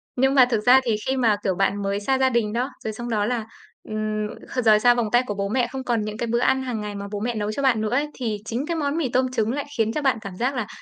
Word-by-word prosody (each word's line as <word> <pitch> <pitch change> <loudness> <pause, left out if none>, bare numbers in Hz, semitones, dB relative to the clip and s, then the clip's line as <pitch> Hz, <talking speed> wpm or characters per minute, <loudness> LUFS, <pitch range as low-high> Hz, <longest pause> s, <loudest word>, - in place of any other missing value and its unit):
Nhưng 265 +2 +2
mà 260 -2 +8
thực 225 -3 +1
ra 255 +2 +7
thì 230 -3 +1
khi 265 - +1
mà, 230 -5 +3
kiểu, 190 -2 0
bạn 195 +2 0
mới 200 +1 -1
xa 265 +6 +1
gia 265 0 +3
đình 230 -4 0
đó, 245 +3 -1
rồi 220 - -3
xong 240 +2 -6
đó 210 -3 +1
là, 235 -1 -1 0.4
ừm, 215 0 -2 0.4
rời 215 -1 +6
xa 245 +2 +5
vòng 240 -2 0
tay 245 +2 +4
của 205 - -2
bố 200 0 -2
mẹ 245 +1 +1
không 265 -1 -5
còn 235 -3 0
những 210 0 -5
cái 235 - -2
bữa 235 +1 +1
ăn 265 +2 +2
hàng 245 -4 -3
ngày 210 -1 -5
mà 200 0 -5
bố 205 - -3
mẹ 235 +3 -2
nấu 210 -1 -2
cho 245 - -3
bạn 250 -5 +3
nữa 215 - -1
ấy, 275 +6 +1
thì 225 -5 -3
chính 235 +5 -3
cái 335 +1 -2
món 290 0 -1
mì 305 -6 0
tôm 255 +1 +1
trứng 225 -3 0
lại 285 +2 -3
khiến 225 -1 +2
cho 305 - -1
bạn 270 -5 +2
cảm 195 -4 -8
giác 255 +4 0
là 235 -5 -2
235 Hz, 310 wpm, -23 LUFS, 215-260 Hz, 0.4 s, mà